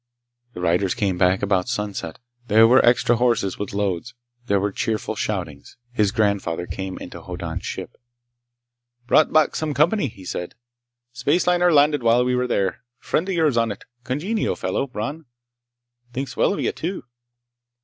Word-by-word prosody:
The 90 Hz, -, -7 dB
riders 90 Hz, +2 st, +1 dB
came 100 Hz, -6 st, -1 dB
back 95 Hz, +2 st, +3 dB
about 95 Hz, +1 st, +1 dB
sunset. 105 Hz, -8 st, -4 dB, 0.3 s
There 110 Hz, +1 st, +6 dB
were 125 Hz, +3 st, +6 dB
extra 120 Hz, 0 st, +4 dB
horses, 120 Hz, -6 st, +1 dB
with 105 Hz, -, -4 dB
loads. 100 Hz, +3 st, -2 dB, 0.3 s
There 100 Hz, -3 st, +2 dB
were 100 Hz, +1 st, -1 dB
cheerful 110 Hz, +2 st, -2 dB
shoutings. 85 Hz, -10 st, -4 dB
His 105 Hz, -5 st, +1 dB
grandfather 100 Hz, -6 st, 0 dB
came 95 Hz, +1 st, -5 dB
into 85 Hz, -1 st, -9 dB
Hoddan's 90 Hz, 0 st, -6 dB
ship. -, -, -6 dB, 1.1 s
"Brought 150 Hz, +5 st, +4 dB
back 155 Hz, -1 st, +3 dB
some 155 Hz, -2 st, -2 dB
company," 160 Hz, +3 st, +3 dB
he 95 Hz, -5 st, -12 dB
said. 90 Hz, 0 st, -5 dB, 0.6 s
"Spaceliner 175 Hz, +7 st, +2 dB
landed 145 Hz, -1 st, +4 dB
while 120 Hz, +1 st, +3 dB
we 125 Hz, -, +1 dB
were 125 Hz, 0 st, +1 dB
there. 100 Hz, -2 st, -1 dB, 0.2 s
Friend 180 Hz, +5 st, -1 dB
of 190 Hz, -, 0 dB
yours 155 Hz, -7 st, +2 dB
on 115 Hz, -1 st, +2 dB
it. 100 Hz, -, -9 dB, 0.2 s
Congenial 175 Hz, -, -1 dB
fellow, 140 Hz, -, -2 dB
Bron. 135 Hz, +6 st, -5 dB, 0.9 s
Thinks 130 Hz, 0 st, -4 dB
well -, -, +2 dB
of 200 Hz, -, -2 dB
you, -, -, 0 dB
too!" 180 Hz, +4 st, -5 dB
115 Hz, 160 wpm, -22 LUFS, 95-140 Hz, 1.1 s, There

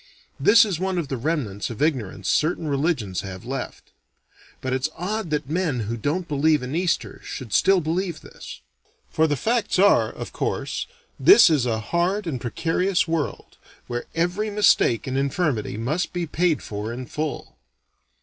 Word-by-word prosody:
This 220 Hz, -, +6 dB
is 190 Hz, -6 st, -3 dB
one 190 Hz, 0 st, -1 dB
of 160 Hz, -5 st, -2 dB
the 135 Hz, -, -1 dB
remnants 120 Hz, -7 st, -2 dB
of 115 Hz, -, -7 dB
ignorance 120 Hz, -, -1 dB
certain 160 Hz, +1 st, +1 dB
religions 140 Hz, -, -1 dB
have 95 Hz, +1 st, -8 dB
left: 135 Hz, +2 st, -6 dB, 0.7 s
but 130 Hz, 0 st, -3 dB
it's 130 Hz, +4 st, 0 dB
odd 200 Hz, +2 st, -3 dB
that 150 Hz, -2 st, -1 dB
men 155 Hz, -5 st, -1 dB
who 110 Hz, +2 st, -3 dB
don't 155 Hz, -, -2 dB
believe 150 Hz, -1 st, +2 dB
in 130 Hz, +4 st, -4 dB
Easter 180 Hz, +1 st, -1 dB
should 125 Hz, -6 st, -7 dB
still 195 Hz, -1 st, +4 dB
believe 170 Hz, +1 st, -2 dB
this. -, -, -11 dB, 0.5 s
For 160 Hz, 0 st, +3 dB
the 145 Hz, -, +1 dB
facts 225 Hz, -, 0 dB
are 200 Hz, +2 st, +4 dB
of -, -, -8 dB
course -, -, -2 dB, 0.3 s
this 385 Hz, -, +8 dB
is 135 Hz, -6 st, +2 dB
a 110 Hz, -2 st, 0 dB
hard 175 Hz, -, 0 dB
and 135 Hz, -8 st, -3 dB
precarious 170 Hz, +8 st, 0 dB
world, 165 Hz, -3 st, -3 dB, 0.3 s
where 120 Hz, 0 st, -4 dB
every 180 Hz, +6 st, 0 dB
mistake 205 Hz, -, +3 dB
and 135 Hz, 0 st, -1 dB
infirmity 140 Hz, -, -1 dB
must 155 Hz, +10 st, -2 dB
be 175 Hz, -1 st, -2 dB
paid 165 Hz, 0 st, 0 dB
for 105 Hz, +1 st, -5 dB
in 125 Hz, +2 st, -6 dB
full. 150 Hz, -, -5 dB
155 Hz, 165 wpm, -23 LUFS, 125-180 Hz, 0.7 s, this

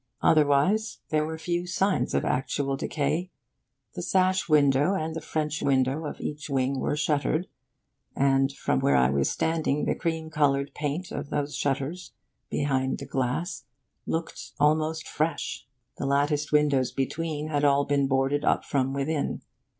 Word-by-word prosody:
Otherwise, 155 Hz, +9 st, +3 dB
there 155 Hz, -1 st, +2 dB
were 160 Hz, 0 st, -4 dB
few 175 Hz, +2 st, -2 dB
signs 190 Hz, +2 st, 0 dB
of -, -, +1 dB
actual 135 Hz, +1 st, 0 dB
decay. 155 Hz, +6 st, -1 dB, 0.6 s
The -, -, -5 dB
sash 185 Hz, -1 st, +1 dB
window 145 Hz, +4 st, +4 dB
and 160 Hz, -3 st, -3 dB
the 165 Hz, -, -4 dB
French 155 Hz, -1 st, -2 dB
window 135 Hz, +3 st, +1 dB
of -, -, -7 dB
each 150 Hz, +1 st, -5 dB
wing 135 Hz, 0 st, 0 dB
were -, -, 0 dB
shuttered, 155 Hz, +2 st, +1 dB, 0.7 s
and, 135 Hz, 0 st, +3 dB
from 70 Hz, -, -1 dB
where 70 Hz, -, +3 dB
I 65 Hz, 0 st, +4 dB
was 70 Hz, 0 st, +1 dB
standing, 160 Hz, -3 st, 0 dB
the -, -, +1 dB
cream 160 Hz, -2 st, -3 dB
coloured 140 Hz, -2 st, +1 dB
paint 150 Hz, +5 st, -3 dB
of 145 Hz, 0 st, -5 dB
those 145 Hz, 0 st, -2 dB
shutters 145 Hz, +6 st, -2 dB, 0.4 s
behind 135 Hz, -2 st, 0 dB
the 140 Hz, -, -7 dB
glass 135 Hz, +3 st, -2 dB, 0.4 s
looked 160 Hz, -6 st, -4 dB
almost 155 Hz, +2 st, +2 dB
fresh. 155 Hz, -4 st, -2 dB, 0.3 s
The 135 Hz, -, -1 dB
latticed 145 Hz, +2 st, +1 dB
windows 145 Hz, -4 st, +3 dB
between 155 Hz, +2 st, -3 dB
had 145 Hz, -1 st, 0 dB
all 140 Hz, 0 st, +4 dB
been 140 Hz, -1 st, +1 dB
boarded 135 Hz, +2 st, +1 dB
up -, -, +2 dB
from 135 Hz, -1 st, 0 dB
within. 140 Hz, +2 st, -2 dB
145 Hz, 150 wpm, -27 LUFS, 135-160 Hz, 0.7 s, window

